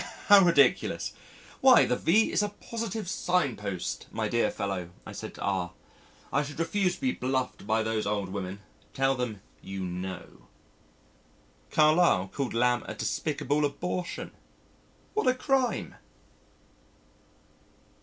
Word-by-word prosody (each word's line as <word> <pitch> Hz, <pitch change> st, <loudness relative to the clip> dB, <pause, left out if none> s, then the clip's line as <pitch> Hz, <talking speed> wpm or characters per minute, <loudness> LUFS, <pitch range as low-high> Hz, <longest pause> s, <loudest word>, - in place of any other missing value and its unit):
'" -, -, -15 dB
"How 200 Hz, -1 st, +9 dB
ridiculous! 145 Hz, -7 st, +3 dB, 0.5 s
Why -, -, +7 dB
the 125 Hz, -, +1 dB
V 195 Hz, -, +3 dB
is -, -, +2 dB
a 210 Hz, -, 0 dB
positive 220 Hz, -1 st, -5 dB
signpost. 105 Hz, -, -1 dB
My -, -, -1 dB
dear -, -, +1 dB
fellow," 95 Hz, -3 st, -3 dB, 0.2 s
I -, -, -8 dB
said -, -, -7 dB
to -, -, -11 dB
R, 90 Hz, -3 st, -1 dB, 0.6 s
"I 140 Hz, -, +3 dB
should 145 Hz, 0 st, -6 dB
refuse 180 Hz, +2 st, +1 dB
to -, -, -17 dB
be 260 Hz, -1 st, +2 dB
bluffed 125 Hz, -, -2 dB
by 110 Hz, 0 st, +2 dB
those 110 Hz, -1 st, -1 dB
old 100 Hz, -2 st, -1 dB
women. 95 Hz, 0 st, -5 dB, 0.3 s
Tell 135 Hz, 0 st, +3 dB
them 120 Hz, -6 st, -4 dB, 0.2 s
you 95 Hz, -1 st, -5 dB
know." 90 Hz, 0 st, -7 dB, 1.2 s
Carlyle 155 Hz, -, +4 dB
called 135 Hz, -4 st, -2 dB
Lamb 120 Hz, +1 st, +3 dB
a -, -, -5 dB
despicable 145 Hz, +3 st, -1 dB
abortion. 175 Hz, +5 st, -3 dB, 0.8 s
What 430 Hz, -, 0 dB
a 255 Hz, -, +4 dB
crime! 265 Hz, -1 st, 0 dB
130 Hz, 135 wpm, -28 LUFS, -, 1.2 s, How